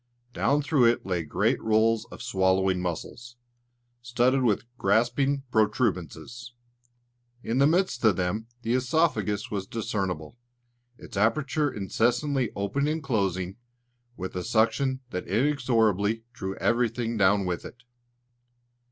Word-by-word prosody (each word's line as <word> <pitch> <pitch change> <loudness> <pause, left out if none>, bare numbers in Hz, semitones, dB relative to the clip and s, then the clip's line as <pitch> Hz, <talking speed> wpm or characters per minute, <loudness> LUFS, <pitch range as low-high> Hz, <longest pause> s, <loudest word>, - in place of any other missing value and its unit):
Down 145 +3 +1
through 140 -4 +3
it 115 0 +2
lay 90 -2 -1
great 75 - 0
rolls 110 0 +2
of - - -9
swallowing 95 -1 +1
muscles, 105 +7 -5 0.7
studded 120 +2 +2
with 115 -2 +1
grasping 125 +7 +2
protuberances. 110 - -1 0.9
In 115 +3 -1
the 140 - +6
midst 165 -7 +1
of 110 -4 +5
them 95 +5 -2 0.2
the 115 - 0
œsophagus 125 -7 0
was 100 -2 -3
discernible, 100 -4 -3 0.6
its - - -12
aperture 140 +7 +1
incessantly 120 +5 0
opening 140 +10 0
and 160 -1 -5
closing 95 -6 -1 0.6
with 95 0 -6
a 90 - -2
suction 130 +4 +1
that 90 - -4
inexorably 115 -3 +1
drew 95 -4 -5
everything 115 0 0
down 100 -1 +3
with 90 -1 -3
it. 120 -1 -12
115 Hz, 120 wpm, -27 LUFS, 95-125 Hz, 0.9 s, the